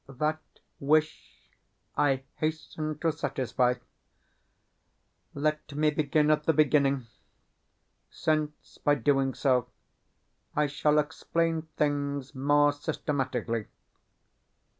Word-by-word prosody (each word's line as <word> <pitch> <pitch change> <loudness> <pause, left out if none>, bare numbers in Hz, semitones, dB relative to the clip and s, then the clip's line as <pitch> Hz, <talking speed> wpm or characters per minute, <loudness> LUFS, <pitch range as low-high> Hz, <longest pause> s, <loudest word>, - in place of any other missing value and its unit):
That 150 +4 -1 0.4
wish 155 +2 0 0.4
I 135 -2 +2
hasten 155 -1 -3
to 165 - +2
satisfy. 125 -3 0 1.6
Let 150 0 -2
me 150 +1 +3
begin 150 0 +2
at 150 0 +1
the 160 - +4
beginning, 140 -3 +3 1.0
since, 155 -1 -2
by 145 - +3
doing 135 0 +1
so, 125 -3 +2 0.9
I 150 - +3
shall 150 +1 +1
explain 160 +2 0
things 145 -2 -1
more 145 +2 +3
systematically. 125 -6 -2
145 Hz, 90 wpm, -28 LUFS, 135-155 Hz, 1.6 s, the